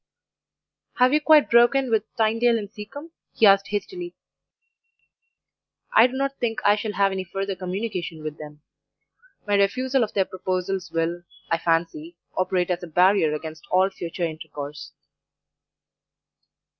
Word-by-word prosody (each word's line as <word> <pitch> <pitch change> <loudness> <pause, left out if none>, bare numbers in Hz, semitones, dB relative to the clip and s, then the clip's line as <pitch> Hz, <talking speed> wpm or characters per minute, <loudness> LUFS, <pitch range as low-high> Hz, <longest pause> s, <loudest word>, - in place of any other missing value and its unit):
"'Have 250 +2 +4
you 305 - +3
quite 305 -1 +5
broken 240 +2 +4
with 220 -2 +2
Tynedale 230 +1 +2
and 205 -2 -6
Seacombe?' 285 +11 -10 0.2
he 225 - +4
asked 195 0 +5
hastily. 350 - -5 1.8
"'I - - +7
do 255 - -11
not 275 +1 -2
think 225 -3 -1
I 205 - +6
shall 210 0 -4
have 200 -1 +2
any 190 -1 -3
further 195 +2 -4
communication 185 -3 -5
with 155 0 -6
them; 150 -1 -11 0.8
my 205 - -1
refusal 255 +6 +2
of 215 - -4
their 195 -2 +2
proposals 185 0 -3
will, 165 +1 -1 0.3
I 165 - +2
fancy, 175 - -1 0.2
operate 185 -1 0
as 180 0 -2
a 175 - -7
barrier 180 0 +3
against 155 0 -8
all 190 +1 +3
future 175 -1 -6
intercourse. 150 -2 -7
195 Hz, 140 wpm, -24 LUFS, 175-235 Hz, 1.8 s, I